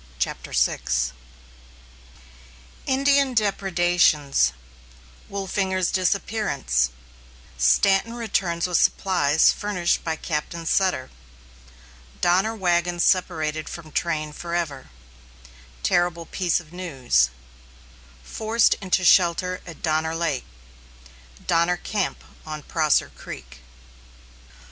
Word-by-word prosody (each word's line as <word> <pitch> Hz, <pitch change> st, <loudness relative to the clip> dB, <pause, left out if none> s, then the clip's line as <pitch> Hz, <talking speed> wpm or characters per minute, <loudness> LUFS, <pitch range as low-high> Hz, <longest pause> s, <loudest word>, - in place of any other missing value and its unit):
] -, -, -24 dB
CHAPTER 65 Hz, -, -3 dB
VI 60 Hz, +1 st, +2 dB, 2.1 s
INDIAN 275 Hz, 0 st, +3 dB
DEPREDATIONS 175 Hz, -, +2 dB, 0.8 s
WOLFINGER'S 190 Hz, -2 st, -1 dB
DISAPPEARANCE 185 Hz, -, 0 dB, 0.7 s
STANTON 195 Hz, -, +3 dB
RETURNS 190 Hz, -7 st, -1 dB
WITH 180 Hz, -1 st, +2 dB
SUPPLIES 160 Hz, -6 st, +3 dB
FURNISHED 185 Hz, -4 st, -1 dB
BY 160 Hz, -1 st, -1 dB
CAPTAIN 165 Hz, +1 st, -4 dB
SUTTER 185 Hz, -7 st, +1 dB, 1.1 s
DONNER 190 Hz, +6 st, +2 dB
WAGONS 175 Hz, -3 st, +1 dB
SEPARATED 155 Hz, -4 st, 0 dB
FROM 160 Hz, -2 st, -9 dB
TRAIN 155 Hz, -3 st, -2 dB
FOREVER 170 Hz, -5 st, -4 dB, 0.9 s
TERRIBLE 175 Hz, -, +1 dB
PIECE 180 Hz, -3 st, +1 dB
OF 165 Hz, -1 st, -15 dB
NEWS 130 Hz, -, +1 dB, 0.9 s
FORCED 220 Hz, -, +2 dB
INTO 185 Hz, -1 st, +1 dB
SHELTER 180 Hz, +1 st, +3 dB
AT 165 Hz, -3 st, -11 dB
DONNER 160 Hz, 0 st, 0 dB
LAKE 165 Hz, -5 st, -2 dB, 1.0 s
DONNER 170 Hz, +1 st, +2 dB
CAMP 205 Hz, 0 st, -3 dB, 0.2 s
ON 155 Hz, -1 st, -7 dB
PROSSER 155 Hz, -3 st, +1 dB
CREEK. -, -, -10 dB
175 Hz, 85 wpm, -23 LUFS, 155-190 Hz, 2.1 s, INDIAN